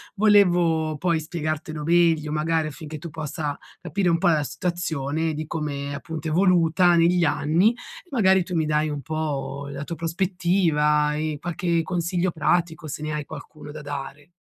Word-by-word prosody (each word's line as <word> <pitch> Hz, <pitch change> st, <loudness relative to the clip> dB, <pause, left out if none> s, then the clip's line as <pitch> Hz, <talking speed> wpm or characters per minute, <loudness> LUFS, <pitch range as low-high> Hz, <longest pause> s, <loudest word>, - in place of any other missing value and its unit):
Volevo 175 Hz, -7 st, +3 dB
poi 170 Hz, 0 st, +1 dB
spiegartelo 155 Hz, -1 st, -4 dB
meglio, 165 Hz, -2 st, +3 dB
magari 155 Hz, +1 st, 0 dB
affinché 155 Hz, +1 st, -8 dB
tu 170 Hz, +3 st, -7 dB
possa 150 Hz, -1 st, -4 dB, 0.2 s
capire 180 Hz, +3 st, -1 dB
un 170 Hz, -, +3 dB
po' 165 Hz, -, +1 dB
la 155 Hz, -3 st, +2 dB
situazione 160 Hz, -2 st, -2 dB
di 155 Hz, +1 st, -4 dB
come 145 Hz, -3 st, -4 dB
appunto 160 Hz, +2 st, -5 dB
è -, -, -3 dB
evoluta 175 Hz, 0 st, +4 dB
negli 170 Hz, +1 st, +4 dB
anni, 170 Hz, +10 st, +2 dB, 0.4 s
magari 190 Hz, -7 st, +4 dB
tu 180 Hz, -, -4 dB
mi 160 Hz, -1 st, +1 dB
dai 155 Hz, 0 st, +1 dB
un 145 Hz, -1 st, -4 dB
po' 145 Hz, -2 st, -3 dB
la 140 Hz, 0 st, -5 dB
tua 165 Hz, +2 st, -6 dB
prospettiva 165 Hz, -4 st, +1 dB
e 155 Hz, 0 st, -2 dB
qualche 170 Hz, 0 st, 0 dB
consiglio 175 Hz, +1 st, -1 dB
pratico, 160 Hz, 0 st, 0 dB
se 150 Hz, 0 st, -6 dB
ne 155 Hz, 0 st, -3 dB
hai 150 Hz, -1 st, -3 dB
qualcuno 150 Hz, 0 st, -10 dB
da 150 Hz, +1 st, -8 dB
dare. 145 Hz, +2 st, -7 dB
160 Hz, 160 wpm, -24 LUFS, 150-175 Hz, 0.4 s, evoluta